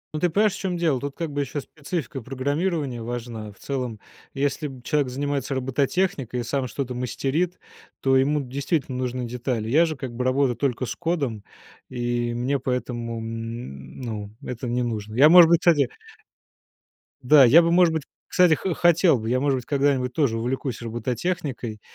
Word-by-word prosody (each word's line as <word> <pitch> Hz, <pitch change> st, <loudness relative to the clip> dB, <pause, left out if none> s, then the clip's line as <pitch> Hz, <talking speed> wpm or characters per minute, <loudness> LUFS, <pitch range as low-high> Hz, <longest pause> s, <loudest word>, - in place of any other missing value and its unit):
Ну, -, -, -1 dB
ты 180 Hz, -, +2 dB
понимаешь, 205 Hz, +3 st, +2 dB
в -, -, -7 dB
чём 180 Hz, -3 st, -2 dB
дело. 160 Hz, -7 st, +1 dB
Тут, 140 Hz, -1 st, -5 dB
как 165 Hz, -3 st, -3 dB
бы, 145 Hz, 0 st, -1 dB
ещё 140 Hz, +2 st, -3 dB
специфика 145 Hz, -2 st, -5 dB
программирования 140 Hz, +1 st, -2 dB
важна. 115 Hz, -2 st, -5 dB
В 100 Hz, -, -20 dB
целом, 125 Hz, -6 st, -4 dB, 0.4 s
если 140 Hz, +2 st, -1 dB
б 130 Hz, -3 st, -11 dB
человек 145 Hz, -1 st, +1 dB
занимается 140 Hz, 0 st, -2 dB
робототехникой 135 Hz, -, 0 dB
и -, -, -4 dB
сам 130 Hz, +2 st, -1 dB
что-то 125 Hz, +2 st, -4 dB
мастерит, 135 Hz, +8 st, -1 dB, 0.4 s
то 135 Hz, 0 st, +2 dB
ему 145 Hz, +3 st, +3 dB
действительно 135 Hz, 0 st, -2 dB
нужны 125 Hz, -1 st, -2 dB
детали. 120 Hz, -2 st, -3 dB
Я 160 Hz, +7 st, +5 dB
же, 155 Hz, -, -3 dB
как 130 Hz, -2 st, -6 dB
бы, 125 Hz, +2 st, -3 dB
работаю 130 Hz, -1 st, +2 dB
только 130 Hz, 0 st, -1 dB
с -, -, -4 dB
кодом. 140 Hz, -11 st, -2 dB, 0.5 s
И 120 Hz, -1 st, -1 dB
мне, 130 Hz, +3 st, 0 dB
поэтому, 120 Hz, -2 st, -3 dB
м, 115 Hz, -, -7 dB
ну, 110 Hz, -4 st, -5 dB
это 125 Hz, 0 st, -5 dB
не 125 Hz, +1 st, 0 dB
нужно. 110 Hz, -2 st, -4 dB
Я, 140 Hz, +5 st, +7 dB
может 175 Hz, -1 st, +9 dB
быть, 170 Hz, 0 st, +4 dB
кстати 145 Hz, -8 st, +4 dB, 1.3 s
да, 135 Hz, +2 st, +7 dB
я 145 Hz, +8 st, +8 dB
бы, 170 Hz, 0 st, +1 dB
может 175 Hz, -1 st, +5 dB
быть, 160 Hz, -2 st, -1 dB, 0.2 s
кстати, 180 Hz, -3 st, +4 dB
хо 185 Hz, +3 st, -2 dB
хотел 170 Hz, -2 st, +4 dB
бы. 110 Hz, +1 st, -4 dB
Я, 125 Hz, +1 st, +2 dB
может 140 Hz, -1 st, +1 dB
быть, 125 Hz, -, -6 dB
когда-нибудь 135 Hz, -3 st, +1 dB
тоже 130 Hz, -6 st, +1 dB
увлекусь 125 Hz, +2 st, -3 dB
робототехникой, 120 Hz, 0 st, -3 dB
130 Hz, 180 wpm, -24 LUFS, 120-150 Hz, 1.3 s, может